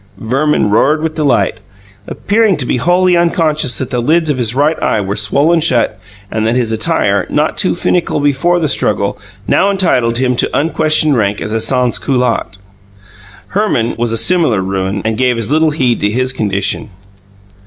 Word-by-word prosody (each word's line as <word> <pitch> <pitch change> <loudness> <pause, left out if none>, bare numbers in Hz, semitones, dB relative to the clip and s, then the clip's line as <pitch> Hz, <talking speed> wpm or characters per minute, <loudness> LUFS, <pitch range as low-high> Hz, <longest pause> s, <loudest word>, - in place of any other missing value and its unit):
Verman 130 -2 0
roared 150 +8 +2
with 160 -1 -2
delight, 150 -5 0 0.5
appearing 210 -2 0
to 130 - -2
be 125 - -1
wholly 180 +6 +2
unconscious 160 -6 +1
that 130 -1 -4
the 125 - -1
lids 160 +4 +1
of 130 - -3
his 120 0 0
right 150 +3 0
eye 110 - 0
were 100 0 -3
swollen 140 - +2
shut 120 -8 +1 0.3
and 110 0 -1
that 115 - 0
his 120 -3 0
attire, 100 -3 0
not 150 +1 0
too 185 - +1
finical 175 -2 -1
before 145 +5 +1
the 160 - 0
struggle, - - 0 0.3
now 200 - +2
entitled 125 -12 0
him 125 0 0
to - - 0
unquestioned 155 -1 +1
rank 100 -3 -1
as 105 - -4
a 115 - -1
sansculotte. 125 -2 0 0.9
Herman 190 - -1
was 120 0 -2
a 115 - 0
similar 160 - +2
ruin, 95 +1 -3
and 110 +1 -2
gave 125 -2 +1
as 115 +2 -2
little 160 +1 +2
heed 130 -6 0
to 105 - 0
his 130 +4 -1
condition. 100 -3 -1
130 Hz, 175 wpm, -13 LUFS, 110-155 Hz, 0.9 s, roared